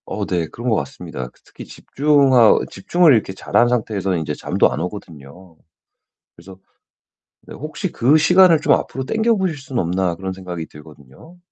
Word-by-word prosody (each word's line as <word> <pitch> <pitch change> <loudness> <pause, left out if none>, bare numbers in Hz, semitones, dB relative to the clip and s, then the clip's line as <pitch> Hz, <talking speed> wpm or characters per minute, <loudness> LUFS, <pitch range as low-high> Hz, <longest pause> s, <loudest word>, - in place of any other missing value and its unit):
어 - - -4
네 85 -3 -2
그런 120 +8 -5
것 110 - +2
같습니다. 65 -2 -6
그 - - -30
특히 - - -12
집중하 135 -5 +3
집중을 165 - +3
이렇게 110 -5 0
잘한 120 +5 +1
상태에서는 100 -6 -2
인제 75 -2 -4
잠도 - - 0
안 65 - -4
오거든요. 85 -2 -9 0.8
그래서 95 -1 -14 0.8
네 - - -13
혹시 155 +6 -6
'그 135 +6 +3
시간을 180 +1 +5
좀 - - +3
앞으로 130 0 -3
당겨 220 - +1
보실 185 -6 -2
수는 130 -3 -4
없나?' 90 0 -1
그런 95 +2 -6
생각이 90 -3 -7
들거든요. 75 - -16
105 Hz, 355 characters per minute, -19 LUFS, -, 0.8 s, 시간을